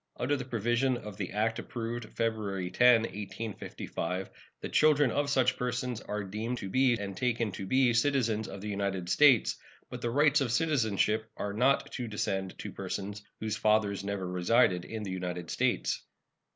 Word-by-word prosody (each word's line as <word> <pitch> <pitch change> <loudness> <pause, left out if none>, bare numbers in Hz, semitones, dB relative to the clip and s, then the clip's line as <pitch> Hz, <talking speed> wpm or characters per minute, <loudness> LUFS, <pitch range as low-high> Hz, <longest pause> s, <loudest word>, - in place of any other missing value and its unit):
Under 140 +4 +1
the 130 -3 -4
provisions 120 +2 +1
of 105 -3 -8
the - - -3
act 110 +2 0
approved 120 0 -4
February 105 -5 -1
10, 125 -2 +6
1855, 100 -3 -5 0.3
the - - -5
children 145 -4 +4
of 145 +3 0
such 130 -2 +2
persons 125 -1 -2
are 105 0 -4
to - - -8
be 110 +5 -3 0.4
deemed - - -7
and 100 -1 -5
taken 120 -3 0
to 95 +1 -6
be 130 +1 +3
citizens 115 -4 +1
of 100 - -8
the 105 - -6
United 100 -3 -2
States, 135 -3 +5 0.3
but - - -6
the 120 - -1
rights 145 +3 +4
of 125 -4 0
citizenship 110 -7 +1
are 100 - -3
not 130 +6 +2
to 125 -2 -4
descend 95 -3 -2
to - - -6
persons 100 +1 -5 0.2
whose 110 -1 -2
fathers 105 -2 +2
never 100 -2 -3
resided 90 0 +2
in 110 -1 -5
the 95 - -4
United 90 -2 -4
States. - - 0
110 Hz, 170 wpm, -30 LUFS, 100-125 Hz, 0.4 s, 10